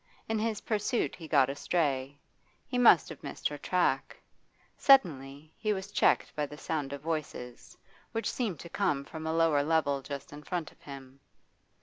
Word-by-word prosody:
In 220 -1 0
his 220 -1 -1
pursuit 220 +3 -1
he 165 -3 -10
got 140 -4 +4
astray; 140 -2 -1 0.5
he 250 - -2
must 245 - +7
have - - -9
missed - - -3
her - - -6
track. - - 0 0.6
Suddenly 155 - +3
he 215 -1 +1
was 195 0 -6
checked - - +2
by 150 -1 -1
the 150 - -10
sound 150 -3 -3
of 140 -1 -6
voices, 150 -6 -5 0.3
which 225 - -1
seemed 210 - -2
to 170 - -9
come 140 -3 0
from 160 +1 -7
a - - 0
lower 165 -3 +3
level 145 -2 +1
just 140 +1 -7
in 145 - -9
front 170 +1 -4
of - - -26
him. 135 -1 -11
155 Hz, 175 wpm, -30 LUFS, 140-185 Hz, 0.6 s, must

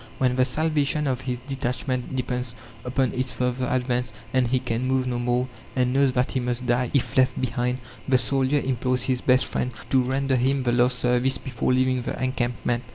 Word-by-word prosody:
When 125 -1 +1
the 130 0 +4
salvation 150 +1 +1
of 130 -2 -1
his 125 -1 -3
detachment 130 -1 -2
depends 125 -1 -2 0.3
upon 130 0 0
its 125 -2 +1
further 125 +2 -1
advance, 125 -1 0 0.2
and 130 -2 +3
he 130 +2 +2
can 125 0 -2
move 130 0 +1
no 125 -1 -2
more, 125 +1 0 0.3
and 125 -1 +1
knows 135 -1 +3
that 125 0 +1
he 130 - 0
must 125 0 -2
die 120 0 +1
if 130 -3 0
left 130 -1 +3
behind, 125 0 -1 0.3
the 130 - +5
soldier 135 +3 +2
implores 125 -1 +1
his 130 -1 0
best 130 0 +3
friend 125 - -2 0.2
to 130 - +5
render 135 +1 0
him 135 +2 +1
the 120 - +1
last 125 +1 +3
service 125 +2 +2
before 130 -2 -2
leaving 130 0 +2
the - - -4
encampment. 120 -2 -1
125 Hz, 195 wpm, -24 LUFS, 125-130 Hz, 0.3 s, the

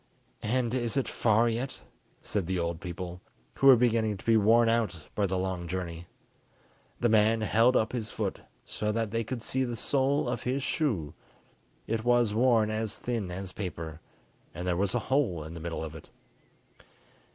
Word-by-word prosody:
"And 120 +1 0
is 120 0 0
it 135 - +1
far 115 +1 +3
yet?" 120 +4 -2 0.4
said 100 -5 -2
the 95 0 -1
old 85 0 -2
people, 90 0 -6 0.3
who 135 - +2
were 135 - +10
beginning 115 -3 +2
to - - -15
be 115 - +4
worn 115 +2 +5
out 115 -6 +1
by 100 -1 +1
the 95 0 -1
long 90 -2 -2
journey. 85 -1 -5 0.9
The 120 - +3
man 110 0 +4
held 115 +4 +3
up 110 - +1
his 115 -3 -3
foot - - -3 0.3
so 105 0 -2
that 110 -1 -1
they 115 +1 0
could 120 +1 -5
see 130 +2 0
the 120 -2 -3
sole 135 +3 +1
of 120 - -2
his 130 +2 -1
shoe; 115 - -1 0.7
it 110 0 -2
was 120 -3 +3
worn 115 -2 +3
as 110 -1 -2
thin 115 -6 -3
as 90 +1 -5
paper, 85 -5 -6 0.5
and 90 +1 -4
there 90 - +1
was 95 +2 0
a - - -3
hole 110 - +1
in 80 +2 -8
the 85 - -7
middle 80 0 -4
of 80 -1 -6
it. 80 - -12
110 Hz, 185 wpm, -29 LUFS, 90-120 Hz, 0.9 s, were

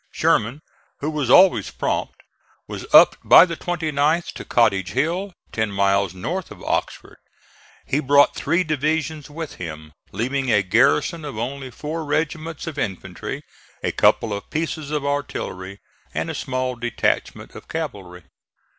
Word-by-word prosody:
Sherman, 120 +8 +1 0.4
who 150 +2 -1
was 150 -5 -2
always 185 +8 +6
prompt, - - -3 0.4
was - - -8
up - - +8
by - - +8
the 170 -2 -5
29th 160 -1 0
to - - -8
Cottage 100 -6 +2
Hill, 170 +9 -1 0.2
ten 110 -2 -1
miles 100 -1 +1
north 170 - -4
of - - -12
Oxford. - - -3 0.7
He 140 - 0
brought 145 0 +4
three 170 +6 +1
divisions 155 -1 -1
with 160 +1 -7
him, 75 -3 -8 0.2
leaving 130 +3 -1
a 105 -4 +4
garrison 125 - +2
of 145 -7 -6
only 130 +3 -4
four 155 +6 -5
regiments 155 +1 -2
of 155 -4 -5
infantry, 95 -7 -5 0.4
a - - 0
couple 110 -2 +3
of 100 - -6
pieces 155 -2 -3
of 150 -2 -2
artillery 100 -9 -4 0.4
and - - -2
a - - -5
small 130 -1 -2
detachment 120 0 -2
of - - -12
cavalry. 90 -3 -6
140 Hz, 145 wpm, -22 LUFS, 110-155 Hz, 0.7 s, up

